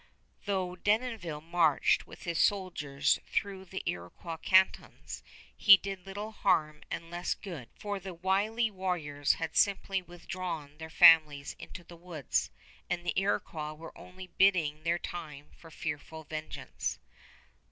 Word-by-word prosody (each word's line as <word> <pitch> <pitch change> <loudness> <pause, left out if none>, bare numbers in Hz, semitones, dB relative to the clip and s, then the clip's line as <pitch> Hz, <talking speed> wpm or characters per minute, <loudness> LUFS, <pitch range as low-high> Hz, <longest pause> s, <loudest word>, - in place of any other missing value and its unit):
Though 190 -3 -1
Denonville 205 -6 -1
marched 165 -2 +2
with - - -12
his 170 -2 -2
soldiers 170 -8 +1
through 195 -1 -2
the 190 +1 -6
Iroquois 90 - -5
cantons, 190 +3 +2 0.3
he 200 -1 +9
did 195 -1 -7
little 205 +3 -5
harm 155 -8 +1
and 165 0 -5
less 175 +1 -2
good; 165 - -8
for 205 -1 -4
the 190 -1 -8
wily 205 +6 +1
warriors 170 -7 0
had 165 -2 -4
simply 195 -1 +2
withdrawn 175 -4 -6
their 160 0 -7
families 155 -3 +6
into 175 - -9
the 170 0 -13
woods, 165 -5 -2 0.4
and 175 -1 -2
the 175 - 0
Iroquois 160 -5 -1
were 160 +2 -11
only 185 +1 -11
biding 170 -6 +4
their 165 +2 +1
time 150 -5 -8
for 165 - -15
fearful 160 0 -5
vengeance. 155 +1 -5
175 Hz, 135 wpm, -31 LUFS, 155-190 Hz, 0.4 s, he